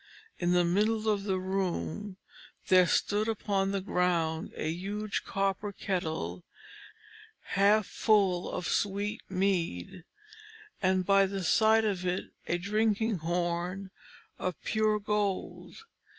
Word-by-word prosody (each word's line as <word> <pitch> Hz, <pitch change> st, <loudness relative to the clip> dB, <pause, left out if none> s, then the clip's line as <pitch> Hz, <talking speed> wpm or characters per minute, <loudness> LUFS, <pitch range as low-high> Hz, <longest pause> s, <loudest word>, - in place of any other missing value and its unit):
In 175 Hz, 0 st, +1 dB
the 175 Hz, -1 st, +4 dB
middle 215 Hz, +5 st, +1 dB
of 205 Hz, -2 st, +1 dB
the 190 Hz, -2 st, 0 dB
room, 185 Hz, -, -3 dB, 0.5 s
there 185 Hz, -2 st, +6 dB
stood 210 Hz, +5 st, +1 dB
upon 200 Hz, -3 st, 0 dB
the 195 Hz, -1 st, -1 dB
ground 170 Hz, -4 st, 0 dB
a -, -, -3 dB
huge 200 Hz, +6 st, -3 dB
copper 195 Hz, +1 st, -1 dB
kettle 160 Hz, -, -3 dB, 1.1 s
half 205 Hz, +2 st, +4 dB
full 195 Hz, -5 st, +2 dB
of 180 Hz, -2 st, -3 dB
sweet 205 Hz, +1 st, -1 dB
mead, 185 Hz, -, -1 dB, 0.8 s
and 185 Hz, -1 st, +2 dB
by 195 Hz, 0 st, +5 dB
the 195 Hz, -1 st, -4 dB
side 220 Hz, +4 st, +4 dB
of 195 Hz, -4 st, -1 dB
it 180 Hz, 0 st, -2 dB, 0.2 s
a 175 Hz, -, +1 dB
drinking 215 Hz, +2 st, 0 dB
horn 175 Hz, +3 st, -2 dB, 0.5 s
of 185 Hz, -, -3 dB
pure 215 Hz, -1 st, +2 dB
gold. 205 Hz, -2 st, -2 dB
195 Hz, 120 wpm, -30 LUFS, 180-205 Hz, 1.1 s, there